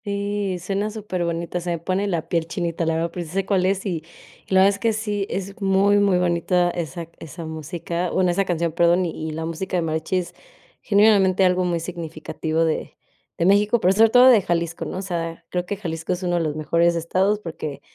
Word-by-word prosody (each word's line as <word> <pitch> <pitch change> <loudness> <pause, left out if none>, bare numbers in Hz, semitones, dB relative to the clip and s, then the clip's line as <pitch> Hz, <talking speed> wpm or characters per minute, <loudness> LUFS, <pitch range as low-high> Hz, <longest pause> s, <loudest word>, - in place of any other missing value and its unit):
Sí, 200 -2 -2
suena 195 +4 -2
superbonita, 175 -5 -3
se 175 - -4
me 170 - 0
pone 185 +4 -1
la 170 -4 -2
piel 165 -1 -1
chinita, 170 -1 -2
la 165 - +1
verdad, 165 +1 -1
pero, 175 - -4
sí 160 - -11
se 195 0 0
cuál 190 -2 +2
es, 195 +1 -1
y 175 -5 -2 0.5
la 190 0 +4
verdad 195 - +6
es 200 0 -3
que 225 +1 +1
sí, 210 -2 -2
es 195 +1 -5
muy, 195 +1 +3
muy 200 -3 +3
bonita 175 0 +1
esa 170 -1 -5
esa 165 +1 -8
música, 170 +2 -4
bueno, 180 0 +2
esa 195 +3 +1
canción, 170 -2 -1
perdón. 175 +2 +3
Y 160 -1 -4
la 160 +1 -4
música 165 +3 -3
de 175 - 0
mariachis, 160 +3 -2 0.5
genuinamente, 200 -3 +4
algo 180 0 +2
muy 175 -1 0
significativo 165 -1 -3
de 160 - -3 0.4
de 170 - +1
México, 205 +4 +4
pero 185 -1 +3
sobre 220 +3 +5
todo 245 +2 +7
de 230 -5 +6
Jalisco, 170 -2 -2
¿no? - - -5
O - - -3
sea, 165 -2 -4
creo 180 0 -2
que 205 - -3
Jalisco 165 -2 -3
es 180 +1 -5
uno 175 -1 0
de - - +1
los 155 -2 -2
mejores 170 +2 +2
estados, 185 +5 +1
porque 160 -6 -6
180 Hz, 210 wpm, -22 LUFS, 165-195 Hz, 0.5 s, todo